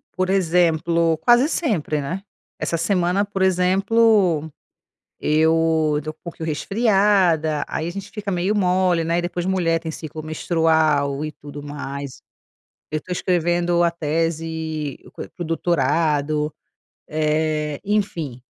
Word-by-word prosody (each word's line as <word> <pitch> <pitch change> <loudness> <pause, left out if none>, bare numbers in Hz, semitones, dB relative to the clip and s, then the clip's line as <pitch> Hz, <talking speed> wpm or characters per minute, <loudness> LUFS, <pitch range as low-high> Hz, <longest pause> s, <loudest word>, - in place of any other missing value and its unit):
Por 185 0 0
exemplo, 170 -3 +2
quase 240 +3 +5
sempre, 165 - 0
né. 180 +8 -4 0.4
Essa 170 - -1
semana, 180 +2 +1
por 200 -1 -5
exemplo, 190 -2 +3 0.7
eu 160 0 +2
eu 150 - -2
tô 155 - -4
um - - -19
pouquinho 165 -2 -6
resfriada, 190 -4 +2
aí 160 - -3
a - - -3
gente 195 +2 -8
fica 210 -2 -5
meio 180 +3 0
mole, 180 -3 +2
né, 170 +1 0
e - - -1
depois 175 0 -3
a - - 0
mulher 165 -3 +1
tem 160 -1 -5
ciclo 155 0 -7
menstrual 155 -3 +1
e 155 - -5
tudo 145 0 -10
o - - -12
mais. 140 -2 -6 0.7
Eu 155 - -1
tô 185 - -11
escrevendo 175 -1 +1
a 170 - +3
tese 160 -2 -2 0.2
co - - -8
para - - -13
o - - -5
doutorado, 155 -2 0 0.6
eh, 155 -1 0
enfim, 170 - -2
165 Hz, 140 wpm, -22 LUFS, 155-185 Hz, 0.7 s, quase